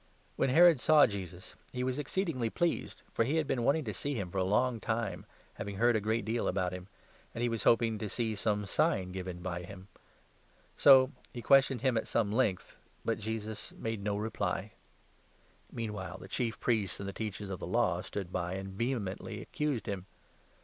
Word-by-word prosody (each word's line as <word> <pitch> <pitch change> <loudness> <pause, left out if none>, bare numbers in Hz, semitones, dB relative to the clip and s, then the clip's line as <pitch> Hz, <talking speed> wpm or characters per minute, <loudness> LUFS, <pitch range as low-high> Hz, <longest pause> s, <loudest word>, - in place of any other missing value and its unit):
When - - +1
Herod 165 +1 +7
saw 155 +3 +6
Jesus, 95 -3 -6 0.2
he 125 0 -2
was 130 +2 -1
ex 150 - -5
8 190 0 +2
Herod. 150 -6 -3
ceed'mgly 115 -1 -1
pleased, 175 -1 -1
for - - +2
he 135 +7 0
had 160 -1 +2
been 120 -3 -1
wanting 150 +5 +3
to 110 -5 -4
see 145 +9 -3
him 95 -6 -3
for 95 - -1
a - - +2
long 115 +5 +2
time, 115 -1 -2 0.3
having 100 0 -5
heard 120 +2 +4
a 110 - +1
great 110 +1 0
deal 115 +2 0
about 90 -1 0
him; 90 0 -7 0.5
and 115 - -2
he 120 - +2
was 115 -3 -3
hoping 115 -2 +4
to 105 - -3
see 110 +2 -1
some 105 0 0
sign 100 - +1
given 90 -1 -6
by 90 -1 -3
him. 95 +2 -11 0.9
So 130 -1 +7 0.2
he 120 - -5
questioned 135 -3 +4
9 130 - +4
him 120 - 0
at 110 - -1
some 110 -3 +1
length,'but 115 0 -2
Jesus 110 0 -5
made 110 -2 -4
no 100 0 0
reply. 105 -2 -2 1.0
Meanwhile 105 -5 -5
the 95 - -11
10 - - -23
Chief 115 +1 -2
Priests 110 -5 0
and 100 - -5
the 100 - -4
Teachers 105 -2 -4
of 90 - -4
the - - -5
Law - - +1
stood 95 -3 -5
by 90 0 -2
and 95 0 -5
vehemently 110 -3 -3
accused 150 -6 -2
him. 100 -2 -4
110 Hz, 205 wpm, -32 LUFS, 95-125 Hz, 1.0 s, Herod